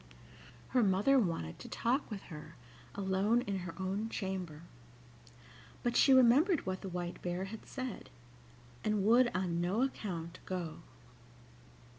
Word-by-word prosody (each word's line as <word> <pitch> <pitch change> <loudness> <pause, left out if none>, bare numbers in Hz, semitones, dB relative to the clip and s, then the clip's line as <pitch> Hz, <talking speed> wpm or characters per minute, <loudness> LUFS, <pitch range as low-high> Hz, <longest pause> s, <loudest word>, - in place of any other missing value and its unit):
Her 250 - +3
mother 210 +7 +4
wanted 165 - -2
to - - -9
talk 255 +5 0
with 205 -4 -6
her 150 0 -9 0.4
alone 200 +4 +2
in 200 -5 -2
her 175 -2 -6
own 195 +4 -2
chamber. 185 -7 -4 1.2
But 240 0 0
she 275 - +6
remembered 265 - +5
what 185 0 -3
the 195 - -5
White 175 -1 -4
Bear 180 +1 -2
had 215 +3 -9
said, 255 -5 -6 0.7
and 210 -2 +1
would 240 +3 +6
on 175 -2 0
no 190 +8 +1
account 180 -10 -4
go. 175 -4 -4
195 Hz, 135 wpm, -34 LUFS, 180-235 Hz, 1.2 s, she